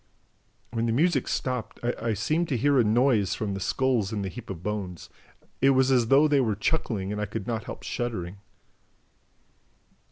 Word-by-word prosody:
When 115 -1 -1
the - - +1
music 150 +2 +2
stopped, 125 -3 -3
I 115 -2 -1
seemed 155 - 0
to 130 - 0
hear 140 +3 +3
a - - +5
noise 110 -2 +2
from 105 -2 -3
the 95 - -4
skulls 120 0 0
in 105 -2 -2
the 95 - -3
heap 85 - -10
of 90 -3 -6
bones; 100 -5 -4 0.5
it 135 - +5
was 130 0 +4
as 125 -3 +3
though 140 +5 +5
they 145 -2 +3
were 110 -5 0
chuckling 105 -5 -1
and 105 0 -3
I 105 - -2
could 105 0 -5
not 115 -1 -3
help - - -8
shuddering." 100 -7 -4
115 Hz, 185 wpm, -27 LUFS, 105-130 Hz, 0.5 s, a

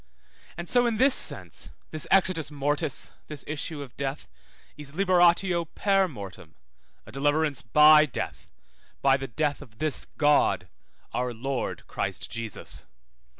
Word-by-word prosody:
And 170 0 -6
so 245 +3 +3
in 230 -2 0
this 265 +3 +5
sense, - - 0 0.2
this 155 -1 -3
exitus 185 -5 +3
mortis, 145 0 -2 0.2
this 150 -2 -8
issue 150 0 -4
of 130 - -14
death, 140 +1 -4 0.5
is 145 -1 -9
liberatio 175 -1 +3
per 195 -2 +3
mortem, 100 - -10 0.5
a - - -12
deliverance 145 +1 +1
by 150 +5 +7
death, 130 - -5 0.6
by 135 -1 +5
the 135 0 -4
death 145 +5 -1
of 115 -6 -14
this 155 +2 -2
God, 145 -1 +3 0.5
our 125 -1 -2
Lord 135 +3 -3
Christ - - -4
Jesus. 115 -2 -6
150 Hz, 135 wpm, -27 LUFS, 135-170 Hz, 0.6 s, by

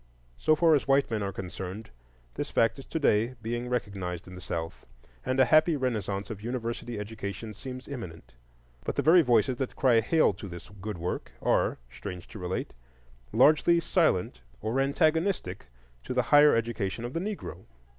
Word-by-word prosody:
So 155 - +4
far 165 0 +4
as 145 - +2
white 135 -2 +3
men 110 -2 -1
are 100 -1 -2
concerned, 95 - -7 0.4
this - - -4
fact 115 +4 +2
is 135 - -10
to - - -3
day 120 -4 +2
being 120 +2 -3
recognized 100 -8 -3
in 90 - -10
the 90 - -9
South, 80 -2 -5 0.4
and 130 +1 -1
a 130 - +7
happy 155 +3 +5
renaissance 105 -7 -2
of 105 -2 -7
university 120 0 -4
education 105 +1 -6
seems 130 +3 -8
imminent. 90 - -8 0.5
But - - -3
the - - 0
very 170 +3 +7
voices 125 -2 +2
that 130 -1 -3
cry 125 -4 +4
hail 155 0 +3
to 100 +2 -9
this 85 +1 -9
good 105 -1 -4
work 85 +2 -4
are, - - +1
strange 90 +5 -8
to 105 - -9
relate, 90 0 -3 0.6
largely 155 +3 +5
silent 155 - +1 0.2
or 110 +5 -1
antagonistic 155 - +1 0.4
to 125 - -4
the 125 - +3
higher 145 0 +8
education 115 -1 -2
of 120 - -5
the 165 - -1
Negro. 185 - -5
115 Hz, 175 wpm, -28 LUFS, 100-140 Hz, 0.6 s, higher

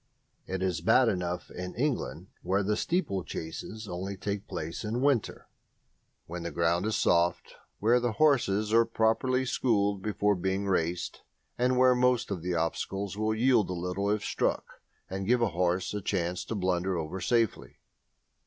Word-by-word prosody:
It 95 0 -3
is 90 -3 -1
bad - - +5
enough 90 -1 -3
in 90 0 -6
England, 105 - -2
where 95 +3 +1
steeplechases 110 - -3
only 95 +2 -5
take 100 +1 -4
place 80 +6 -5
in 110 +3 -2
winter, 140 -6 0 0.8
when 85 +1 -6
the 85 - -3
ground 85 +3 +1
is 110 - 0
soft, 85 -3 +1 0.2
where 115 +4 +3
the 120 -2 -1
horses 110 -8 +2
are 115 0 +6
properly 115 +3 +1
schooled 100 -6 +1
before 105 0 +1
being 95 +1 -1
raced, 90 -2 -1 0.3
and 125 +1 +1
where 130 0 +6
most 125 -3 +2
of 90 -4 -3
the 90 +1 -2
obstacles 95 +4 -2
will 110 +1 0
yield 120 -3 +3
a - - -1
little 90 +3 -2
if 105 0 0
struck - - -2 0.3
and 95 0 -4
give 125 +2 +4
the 115 - +3
horse 90 +2 0
a 105 - -3
chance 90 -2 -1
to 115 - -4
blunder 90 -1 0
over 85 +4 -4
safely. 115 +3 0
100 Hz, 160 wpm, -29 LUFS, 90-115 Hz, 0.8 s, are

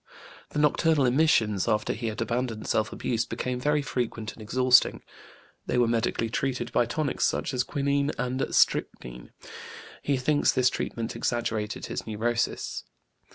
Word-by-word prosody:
The - - -6
nocturnal 150 0 +3
emissions, 120 -7 +2
after 105 0 +1
he 115 +1 -4
had 110 +1 -4
abandoned 115 -2 -3
self 110 -1 +1
abuse, 115 -1 -1
became 125 +1 -3
very 150 +2 +1
frequent 115 -5 -3
and - - -14
exhausting. 125 +3 +3 0.6
They - - 0
were 120 -1 +4
medically 115 0 0
treated 120 +1 -2
by 120 - +2
tonics 145 +3 -1
such 135 - 0
as 125 - +1
quinine 140 +1 0
and 125 +2 -1
strychnine. - - 0 0.7
He 140 -2 0
thinks 145 +3 +2
this 130 0 +3
treatment 115 -1 -4
exaggerated 115 -2 -2
his - - -5
neurosis. 115 +2 -2
120 Hz, 145 wpm, -27 LUFS, 115-135 Hz, 0.7 s, were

